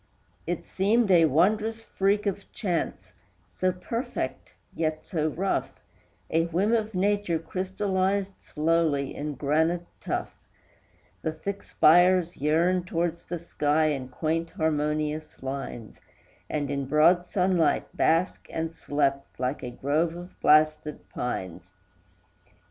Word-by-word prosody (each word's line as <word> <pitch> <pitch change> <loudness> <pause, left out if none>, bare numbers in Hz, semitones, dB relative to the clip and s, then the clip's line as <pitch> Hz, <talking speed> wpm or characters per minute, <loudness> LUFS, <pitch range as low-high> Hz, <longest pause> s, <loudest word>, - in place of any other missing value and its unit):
It - - -2
seemed 205 +2 +2
a 170 -2 +7
wondrous 215 +9 +2
freak 205 -1 +1
of 200 0 -3
chance, 180 -6 -3 0.4
so 185 0 0
perfect, 230 +8 -4 0.2
yet 155 -1 -2
so 155 -4 -1
rough, 185 +6 -2 0.5
A 165 +1 +3
whim 185 +7 +1
of 220 -2 0
Nature 200 -2 +1
crystallized 190 +2 -1
slowly 155 -3 0
in 150 0 -4
granite 160 +6 +1
tough; - - -3 0.9
The 160 - -1
thick 195 +6 -5
spires 175 +2 +4
yearned 170 +5 +2
towards 170 0 -1
the 175 - -4
sky 155 -2 +1
in 135 -4 -2
quaint, 160 +6 -2
harmonious 150 -1 -2
lines, 130 -4 -6 0.5
And 145 -2 -2
in 140 -1 -2
broad 170 +5 +4
sunlight 180 -6 +2
basked 165 +3 +1
and 160 0 -3
slept, 140 -4 -1
like 130 +3 -1
a 125 - -5
grove 150 +7 0
of 175 +1 -10
blasted 155 0 +3
pines. 95 -6 -5
165 Hz, 120 wpm, -27 LUFS, 150-185 Hz, 0.9 s, a